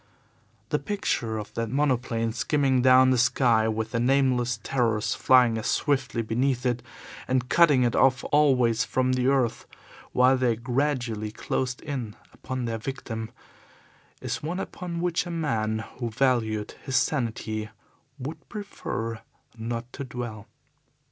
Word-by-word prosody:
The - - +1
picture 120 - -2
of 105 - -7
that 115 -1 -2
monoplane 125 -4 0
skimming 135 -1 +1
down 130 0 +6
the 125 - +3
sky, 120 -2 +3
with 110 0 -2
the 115 - 0
nameless 125 -2 +2
terrors 115 -5 0
flying 125 -3 +4
as 110 - -4
swiftly 130 -5 0
beneath 125 +3 0
it 120 -1 0 0.5
and 130 -1 0
cutting 150 -7 +5
it 120 -2 +1
off 130 -1 +3
always 125 -6 +4
from 130 0 0
the 130 0 +1
earth 135 -4 +1 0.4
while 130 +1 +4
they 125 -3 +2
gradually 120 -3 -1
closed 125 +3 -3
in 125 -8 -4 0.2
upon 130 -1 -5
their 115 -1 -3
victim, 115 -2 -5 0.9
is - - -3
one 170 +5 -3
upon 175 -3 -5
which 175 0 0
a - - -5
man 110 -10 -1
who 120 -2 -2
valued 110 -3 0
his 130 - -3
sanity 110 -6 -1 0.5
would 140 +4 -8
prefer 115 - -5 0.3
not 115 +1 -5
to - - -5
dwell. 120 -4 -6
125 Hz, 140 wpm, -26 LUFS, 115-135 Hz, 0.9 s, down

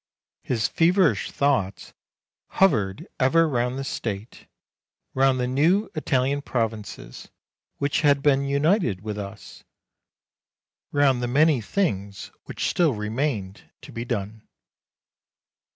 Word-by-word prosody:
His 115 -4 -1
feverish 165 - +2
thoughts 130 -9 -1 0.5
hovered 105 - +1
ever 165 +6 +4
round 125 -2 -1
the 135 - -3
State, 110 -4 -5 0.7
round 135 -1 +3
the 125 - 0
new 160 - +2
Italian 140 -2 0
provinces 110 - -4 0.5
which 140 +2 0
had 140 -2 +3
been 140 -2 +3
united 140 - +1
with 105 0 -5
us, 100 +1 -9 1.3
round 140 -3 +3
the 120 - -1
many 145 +1 +3
things 100 - -2
which - - -3
still 160 -8 +2
remained 105 -2 -3
to 140 - -11
be 115 -2 -5
done. 110 -3 -4
130 Hz, 110 wpm, -24 LUFS, 105-145 Hz, 1.3 s, ever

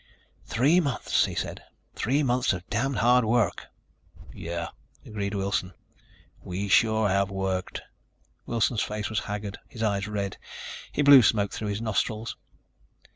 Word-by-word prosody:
"Three 145 +10 +3
months," 140 - +1
he - - -5
said. - - -4 0.3
"Three 140 +6 +1
months 125 -2 +2
of 90 -1 -7
damn 135 +5 0
hard 125 +2 +4
work." 110 -5 +1 0.7
"Yeah," 85 0 -4 0.4
agreed 105 -1 -3
Wilson, 95 -2 -1 0.7
"we 95 +3 -4
sure 110 +1 +4
have 100 0 +1
worked." 95 -1 -3 0.6
Wilson's 115 -1 +1
face 105 0 -3
was 110 - +1
haggard, 105 0 -5
his 115 - -6
eyes 100 -1 0
red. 100 -2 -3 0.5
He 145 - 0
blew 140 -2 +9
smoke 105 -2 +2
through 110 - -4
his 105 +2 -3
nostrils. 110 +1 -1
105 Hz, 135 wpm, -27 LUFS, 100-120 Hz, 0.7 s, blew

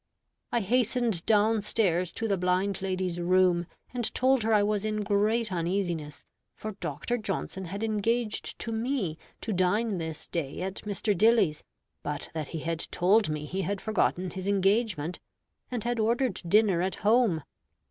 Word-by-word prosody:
I 240 - +1
hastened 235 -3 +1
down 220 0 +4
stairs 180 -5 +1
to 225 - -2
the 200 - +2
blind 185 +1 0
lady's 185 -2 -2
room, 175 -1 +3 0.3
and 240 -3 0
told 260 0 +3
her 225 +1 0
I 210 -2 +5
was 210 -1 0
in 215 -1 -1
great 210 +2 +1
uneasiness, 170 -4 -2 0.3
for 215 - -5
Dr. 240 +4 -3
Johnson 195 -2 -3
had 200 +5 -5
engaged 225 +1 0
to 230 - -4
me 225 - -1 0.2
to 220 - -2
dine 190 +3 +1
this 160 -1 -5
day 160 -1 -3
at 190 +1 -4
Mr. 205 +1 0
Dilly's, 210 -6 +3 0.4
but 150 0 -5
that 155 -3 -3
he 160 - -5
had 165 0 -2
told 200 +2 +3
me 150 -1 -3
he 190 +5 -3
had 195 +2 -2
forgotten 185 -4 0
his 190 +2 -5
engagement, 195 -4 +1 0.5
and 245 -4 -3
had 240 -1 -1
ordered 235 -1 +1
dinner 200 -2 +4
at 185 +1 -1
home. 215 - +4
200 Hz, 160 wpm, -28 LUFS, 180-225 Hz, 0.5 s, I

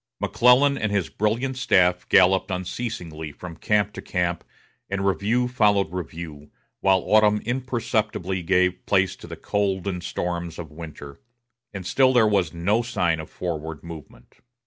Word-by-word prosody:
McClellan 135 +3 +4
and 110 - -1
his 100 -4 0
brilliant 115 +5 -1
staff 90 -8 +2
galloped 95 +1 +4
unceasingly 90 -5 -5
from 85 +3 -9
camp 105 +3 0
to - - -7
camp, 85 -2 -2 0.5
and 100 0 -2
review 110 +6 +1
followed 105 -7 +2
review, 80 -4 -7 0.3
while 95 -1 +3
autumn 105 -1 +4
imperceptibly 110 -7 -2
gave 90 +1 +1
place 95 -2 +2
to - - -12
the - - -8
cold 100 -2 -1
and 90 -3 -3
storms 85 -2 -4
of 80 -4 -8
winter; 75 -3 -10 0.5
and 95 -4 -7
still 130 +6 +3
there 120 -3 +5
was 100 -6 +1
no 100 +7 +1
sign 90 -9 0
of 80 - -8
forward 80 -3 -5
movement. 80 -7 -12
95 Hz, 145 wpm, -24 LUFS, 85-105 Hz, 0.5 s, there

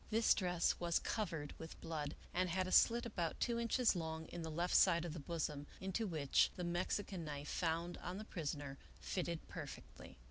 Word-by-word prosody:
This 225 +1 +5
dress 180 -3 +1
was 170 -1 +2
covered 165 -9 -2
with 160 0 -8
blood, 150 -3 -3 0.2
and 180 +1 +1
had 185 +2 +1
a 185 - -4
slit 235 +5 +6
about 175 -8 -2
two 235 -1 +1
inches 235 -1 +3
long 160 -1 -3
in 175 - -5
the 160 - -4
left 170 +3 0
side 170 -3 +6
of 165 - -4
the 165 - -5
bosom, 150 -1 -3
into 190 +4 -1
which 150 -6 +3
the 180 - -4
Mexican 175 +1 -1
knife, 145 -1 -5
found 170 +1 -1
on 180 +2 -4
the 215 - -6
prisoner, 145 -7 -4 0.2
fitted 170 -3 -3
perfectly. 65 - -8
170 Hz, 185 wpm, -39 LUFS, 160-185 Hz, 0.2 s, slit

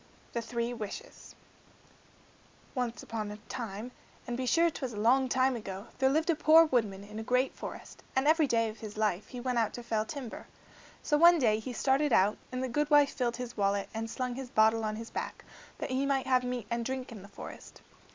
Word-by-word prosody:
The 235 - -1
Three 235 +1 -2
Wishes 235 - -8 1.4
Once 245 -3 -3
upon 215 -2 -4
a 210 - -7
time, 230 -1 -5 0.3
and 240 - -3
be 255 +1 -2
sure 335 +6 +4
't - - -8
was 255 -3 -3
a - - -7
long 255 +4 +4
time 260 +1 +2
ago, 195 -3 -6
there 265 - +4
lived 315 +4 +2
a - - +1
poor 320 +1 +7
woodman 215 -9 0
in 210 +2 -8
a - - -4
great 250 +3 +1
forest, - - -9
and 265 +2 +2
every 315 -1 +5
day 230 -2 +2
of 220 0 -7
his 215 -1 -8
life 210 -3 0
he 250 - -7
went 250 -1 0
out 225 - 0
to 240 - -7
fell 220 -2 0
timber. 255 -1 -7 0.6
So 295 - +2
one 345 +1 +8
day 220 -7 +3
he 235 +4 -6
started 275 +3 +2
out, 205 0 +3
and 255 0 -2
the - - 0
goodwife 290 +2 +4
filled 240 -3 -1
his 250 -1 -6
wallet 200 -1 0
and 225 0 -3
slung 250 +1 -3
his 260 0 -6
bottle 220 -2 +4
on 215 0 -1
his 225 +1 -8
back, - - -5 0.3
that - - -4
he 265 +2 +1
might 270 -1 +1
have 255 -1 +3
meat 250 -3 -3
and 235 0 0
drink 260 +1 -4
in 215 -4 -9
the 200 - -12
forest. 200 - -11
245 Hz, 220 wpm, -31 LUFS, 220-265 Hz, 1.4 s, one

